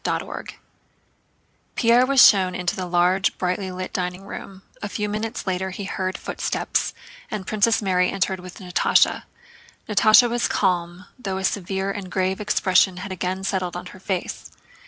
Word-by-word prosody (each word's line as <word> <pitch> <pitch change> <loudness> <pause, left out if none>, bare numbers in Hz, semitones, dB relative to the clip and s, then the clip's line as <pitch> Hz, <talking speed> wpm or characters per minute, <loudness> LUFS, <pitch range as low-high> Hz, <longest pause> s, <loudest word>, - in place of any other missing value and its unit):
CHAPTER - - -1 0.2
XVII - - -10 1.2
Pierre 235 +2 +4
was 275 -2 +8
shown 185 -3 +3
into 180 -1 -1
the 185 -1 -4
large, 180 +2 +2
brightly 185 +1 -2
lit 185 0 -6
dining 180 -1 -3
room; 195 -1 -9 0.2
a 205 - -4
few 210 +1 -2
minutes 215 +3 -4
later 190 0 -1
he 190 +2 -6
heard 185 -1 -3
footsteps - - -2 0.3
and 200 -3 -5
Princess 215 +2 +2
Mary 180 -2 +2
entered 190 -1 -1
with 180 0 -10
Natásha. 180 -2 +2 0.6
Natásha 215 +3 +6
was 240 0 0
calm, 180 -2 -1
though 195 -5 -3
a 190 - -4
severe 195 0 -1
and 195 -2 -6
grave 190 +1 -1
expression 190 -2 +2
had 195 +2 -6
again 185 +1 -3
settled 185 -3 -2
on - - -7
her 185 - -13
face. 185 -1 -4
190 Hz, 160 wpm, -23 LUFS, 185-205 Hz, 1.2 s, was